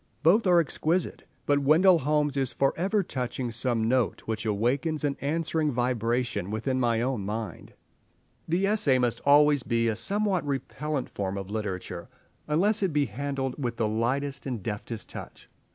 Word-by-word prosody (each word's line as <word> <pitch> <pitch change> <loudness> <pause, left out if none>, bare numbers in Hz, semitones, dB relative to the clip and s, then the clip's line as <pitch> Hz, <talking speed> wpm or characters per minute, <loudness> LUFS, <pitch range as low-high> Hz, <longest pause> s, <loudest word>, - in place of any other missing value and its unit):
Both 195 +7 +4
are 175 -1 +6
exquisite, 165 +2 -1 0.2
but 145 0 +3
Wendell 165 +6 +5
Holmes 150 0 +1
is 135 -2 0
for 135 0 +2
ever 195 +4 +1
touching 125 -4 -3
some 115 -1 0
note 125 0 +1
which 110 0 -4
awakens 130 +9 0
an 140 -1 0
answering 155 +1 0
vibration 120 -4 -1
within 120 +5 -1
my 115 -2 +1
own 125 -5 -1
mind. 110 +2 -5 0.7
The 175 +4 +1
essay 200 -11 +3
must 120 -2 0
always 145 0 +6
be 115 -1 0
a 110 - +1
somewhat 200 - +1
repellent 145 0 -3
form 100 -1 -4
of 100 0 -6
literature, 105 -4 -4 0.4
unless 200 +8 +2
it 190 -3 +1
be 145 -1 +2
handled 135 +3 -3
with 120 -1 -2
the 110 - +1
lightest 135 +6 -1
and 120 -7 -4
deftest 105 +1 -5
touch. - - -10
135 Hz, 160 wpm, -27 LUFS, 115-155 Hz, 0.7 s, are